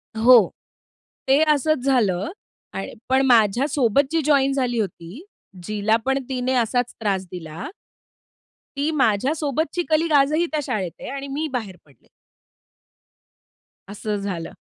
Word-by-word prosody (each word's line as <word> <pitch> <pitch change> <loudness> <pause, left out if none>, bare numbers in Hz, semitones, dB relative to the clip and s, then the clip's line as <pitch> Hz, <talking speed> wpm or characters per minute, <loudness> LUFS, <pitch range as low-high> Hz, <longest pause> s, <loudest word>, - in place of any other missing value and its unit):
हो, 230 -3 +6 0.8
ते 275 +3 +4
असंच 290 -2 0
झालं 220 - +1 0.5
आणि - - -5 0.2
पण 265 +1 +4
माझ्यासोबत 245 +2 +3
जी 325 -1 +1
जॉइन 275 -2 +3
झाली 245 -4 -1
होती, 190 - -5 0.4
जिला 215 +2 0
पण 270 +1 +1
तिने 255 0 -1
असाच 245 +1 0
त्रास 195 -4 -1
दिला 165 -3 -7 1.1
ती 290 +2 0
माझ्यासोबतची 290 - 0
कलीग 315 +1 +2
आजही 305 +5 +2
त्या 310 - 0
शाळेत 190 -9 -3
आहे - - -7
आणि 275 0 -6
मी 295 +3 -3
बाहेर 215 -7 -4
पडले. 140 -3 -26 1.8
असं 210 +1 -4
झालं 180 -5 -4
250 Hz, 125 wpm, -22 LUFS, 205-280 Hz, 1.8 s, हो